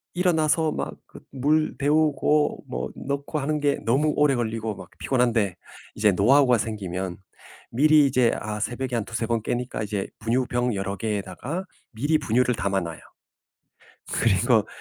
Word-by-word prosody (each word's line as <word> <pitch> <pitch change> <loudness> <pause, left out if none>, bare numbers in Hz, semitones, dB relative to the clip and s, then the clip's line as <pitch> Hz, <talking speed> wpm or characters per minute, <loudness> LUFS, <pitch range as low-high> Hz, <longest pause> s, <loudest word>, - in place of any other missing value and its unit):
일어나서 160 -3 +2
막 - - -4
그 - - -14
물 150 +4 +1
데우고 150 0 +2
뭐 60 +1 -4
넣고 140 +3 -4
하는 150 +2 -1
게 145 -1 +1
너무 145 +6 +2
오래 150 -2 +4
걸리고 110 -2 -2
막 90 -2 -11
피곤한데 115 -7 +1 0.4
이제 105 -1 +3
노하우가 125 +6 +4
생기면 95 -4 -4 0.5
미리 150 +4 +5
이제 125 -3 +3
아 105 0 -4
새벽에 120 +3 -3
한 115 - -1
2-3 115 0 -3
번 115 -1 0
깨니까 120 -2 -3
이제 100 -2 -3
분유병 120 +1 0
여러 100 0 -3
개에다가 110 - -4 0.3
미리 145 +7 +1
분유를 125 -1 +1
담아 100 -2 0
놔요. 85 -1 -6 1.1
그리고 - - +3
120 Hz, 295 characters per minute, -25 LUFS, 105-145 Hz, 1.1 s, 미리